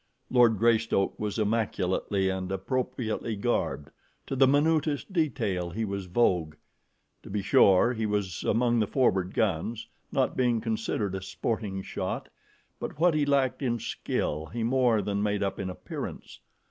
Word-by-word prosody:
Lord 120 Hz, -3 st, +5 dB
Greystoke 115 Hz, -2 st, +2 dB
was 105 Hz, 0 st, -2 dB
immaculately 105 Hz, -3 st, 0 dB
and 95 Hz, 0 st, -2 dB
appropriately 115 Hz, +2 st, -2 dB
garbed 100 Hz, -, -1 dB, 0.3 s
to 135 Hz, -, -3 dB
the 135 Hz, 0 st, +5 dB
minutest 150 Hz, +4 st, +1 dB
detail 105 Hz, -, 0 dB
he 110 Hz, +6 st, -2 dB
was 100 Hz, -2 st, -4 dB
vogue. 90 Hz, -6 st, +1 dB, 0.7 s
To -, -, -12 dB
be 100 Hz, 0 st, -2 dB
sure, 100 Hz, +5 st, +5 dB
he 110 Hz, -2 st, -2 dB
was 100 Hz, -5 st, -2 dB
among 120 Hz, 0 st, +2 dB
the 105 Hz, -, +1 dB
forward 95 Hz, -9 st, +1 dB
guns, 110 Hz, +3 st, -1 dB, 0.2 s
not -, -, +1 dB
being 120 Hz, -2 st, +2 dB
considered 110 Hz, -3 st, -2 dB
a 95 Hz, -, -3 dB
sporting 95 Hz, +1 st, -3 dB
shot, -, -, -4 dB, 0.5 s
but 145 Hz, -, -6 dB
what 175 Hz, 0 st, +4 dB
he 150 Hz, -2 st, +1 dB
lacked 140 Hz, -2 st, +1 dB
in 120 Hz, -3 st, 0 dB
skill 80 Hz, -7 st, -3 dB
he 115 Hz, +4 st, -4 dB
more 120 Hz, -3 st, +2 dB
than 100 Hz, 0 st, -1 dB
made 105 Hz, -1 st, 0 dB
up 100 Hz, -, -2 dB
in 95 Hz, -, -3 dB
appearance. 90 Hz, -, -7 dB
110 Hz, 150 wpm, -28 LUFS, 95-125 Hz, 0.7 s, Lord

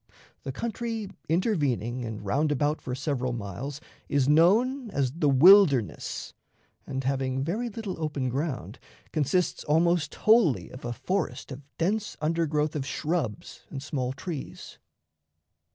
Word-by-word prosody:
The 135 Hz, -, -4 dB
country 225 Hz, -, -4 dB, 0.2 s
intervening 140 Hz, -, 0 dB
and 110 Hz, -2 st, -6 dB
round 150 Hz, +10 st, +1 dB
about 145 Hz, +2 st, 0 dB
for 125 Hz, -, -4 dB
several 130 Hz, -2 st, -2 dB
miles 120 Hz, +6 st, -5 dB, 0.3 s
is 140 Hz, -2 st, +2 dB
known 220 Hz, -, +4 dB
as 135 Hz, -9 st, 0 dB
the 150 Hz, 0 st, +1 dB
"Wilderness," 140 Hz, -, +5 dB, 0.5 s
and, 135 Hz, 0 st, -3 dB
having 135 Hz, 0 st, -1 dB
very 215 Hz, -, -2 dB
little 205 Hz, -6 st, -6 dB
open 145 Hz, -4 st, -1 dB
ground, 135 Hz, 0 st, -3 dB, 0.3 s
consists 155 Hz, +5 st, 0 dB
almost 165 Hz, 0 st, +2 dB
wholly 215 Hz, -, +3 dB
of 130 Hz, -, -9 dB
a 120 Hz, -, -2 dB
forest 145 Hz, -4 st, -3 dB
of 130 Hz, +1 st, -7 dB, 0.2 s
dense 205 Hz, +5 st, -1 dB
undergrowth 155 Hz, -1 st, 0 dB
of 145 Hz, -, -1 dB
shrubs 145 Hz, -, -3 dB
and 135 Hz, -2 st, -6 dB
small 130 Hz, -4 st, -2 dB
trees. 150 Hz, +1 st, -7 dB
150 Hz, 130 wpm, -27 LUFS, 130-180 Hz, 0.5 s, Wilderness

